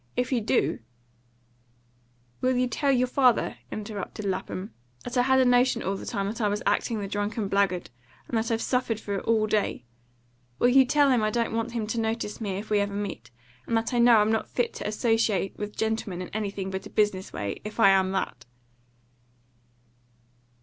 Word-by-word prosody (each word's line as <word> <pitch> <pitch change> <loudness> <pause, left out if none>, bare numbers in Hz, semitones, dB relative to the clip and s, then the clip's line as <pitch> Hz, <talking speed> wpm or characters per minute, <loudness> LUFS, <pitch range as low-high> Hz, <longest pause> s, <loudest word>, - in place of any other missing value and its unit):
"If 250 +1 0
you 245 -3 +1
do 225 +4 +1 0.8
" 120 0 -38
"Will 255 0 +2
you 250 - +3
tell 275 +4 0
your 255 -1 +3
father," 250 -1 +2
interrupted 210 -1 -6
Lapham, 190 +1 -4 0.3
"that 245 - -6
I 245 - +4
had 265 +1 +3
a 260 - +5
notion 245 -1 +3
all 195 - -1
the - - -8
time 200 -4 -2
that 220 +4 -4
I 210 - +2
was 205 +3 -2
acting 230 -3 +1
the 200 - -4
drunken 205 +1 -2
blackguard, 195 -5 0 0.4
and - - -4
that 225 0 0
I've 225 -1 0
suffered 250 -4 0
for 205 - -5
it 195 - -3
all 220 -1 +3
day? 210 - -1 0.7
Will 245 - +4
you 265 +1 +6
tell 285 +1 +4
him 245 -3 +3
I 215 - +2
don't 230 +1 -1
want 230 +1 -2
him 230 -3 -2
to 225 +2 -2
notice 225 -1 -2
me 195 -3 -2
if 215 +2 -7
we 210 - +4
ever 200 0 -1
meet, 205 -1 -5 0.4
and 230 - +1
that 225 +3 -2
I 240 - +2
know 235 -1 +7
I'm 210 +1 +3
not 220 - -1
fit 245 - -1
to - - -5
associate 215 -3 +1
with 210 0 -5
gentlemen 220 -5 -2
in - - -8
anything 200 -2 -4
but 190 0 -5
a - - -14
business 205 -3 0
way, 100 -1 -4
if 210 +2 -8
I 195 - +7
am 190 -1 +3
that?" 190 - -3
215 Hz, 205 wpm, -26 LUFS, 195-240 Hz, 0.8 s, know